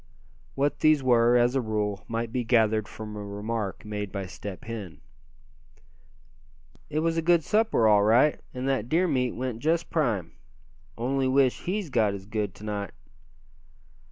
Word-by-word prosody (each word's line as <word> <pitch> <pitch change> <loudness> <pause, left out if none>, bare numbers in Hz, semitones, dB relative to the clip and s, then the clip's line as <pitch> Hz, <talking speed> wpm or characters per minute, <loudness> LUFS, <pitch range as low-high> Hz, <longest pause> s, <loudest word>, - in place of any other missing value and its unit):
What 140 +1 0
these 155 -3 +4
were, 120 -1 +4
as 120 +1 +3
a 135 - +1
rule, 105 -4 -2
might 115 0 -3
be 125 -1 0
gathered 110 -3 +2
from 105 -1 -8
a 105 - -6
remark 105 0 -4
made 105 -2 -4
by 100 -1 -4
Step 95 +1 -8
Hen. 100 -9 -7 1.9
"It 155 +1 -1
was 165 0 0
a - - +2
good 170 0 +3
supper, 215 - +2
all 105 -1 +5
right, 120 +8 +4
and 130 +1 -4
that 130 -4 -1
deer 175 +5 +2
meat 125 -5 0
went 125 -2 -4
just 160 +5 0
prime. 115 - 0 0.7
Only 130 +3 0
wish 130 -1 +2
he's 185 -3 -2
got 110 -5 +2
as 95 -1 -9
good 105 -2 -3
to - - -13
night." 100 -2 -4
115 Hz, 160 wpm, -27 LUFS, 105-135 Hz, 1.9 s, all